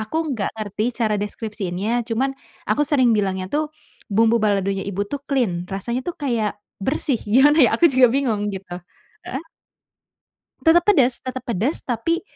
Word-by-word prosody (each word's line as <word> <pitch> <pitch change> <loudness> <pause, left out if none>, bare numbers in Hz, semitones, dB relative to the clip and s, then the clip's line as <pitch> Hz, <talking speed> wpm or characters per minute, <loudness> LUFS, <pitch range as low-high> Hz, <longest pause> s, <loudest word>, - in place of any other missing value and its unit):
aku 220 +7 -4 0.2
nggak 215 -6 -1
ngerti 210 -1 -3
cara 220 -3 +1
deskripsiinnya 205 -2 -4 0.2
cuman 250 +4 0 0.4
aku 260 +8 +3
sering 255 -5 +4
bilangnya 190 -2 -1
tuh 300 +1 +2 0.5
bumbu 225 +3 +3
baladonya 195 -2 +1
ibu 200 0 -3
tuh 285 - -2
clean, 210 - 0
rasanya 235 +6 -3
tuh 350 - -4
kayak 230 -7 0 0.2
bersih. 265 +3 0
Gimana 285 +8 +5
ya, 235 - +4
aku - - +2
juga 255 -1 +6
bingung 230 -5 0
gitu. 185 -2 -9 0.5
Heeh? 265 +4 -4 1.2
Tetap 340 +1 +5
pedes 265 -12 +4
tetep 260 -1 -5
pedes 235 - -1
tapi 255 +8 -1
230 Hz, 150 wpm, -22 LUFS, 205-265 Hz, 1.2 s, juga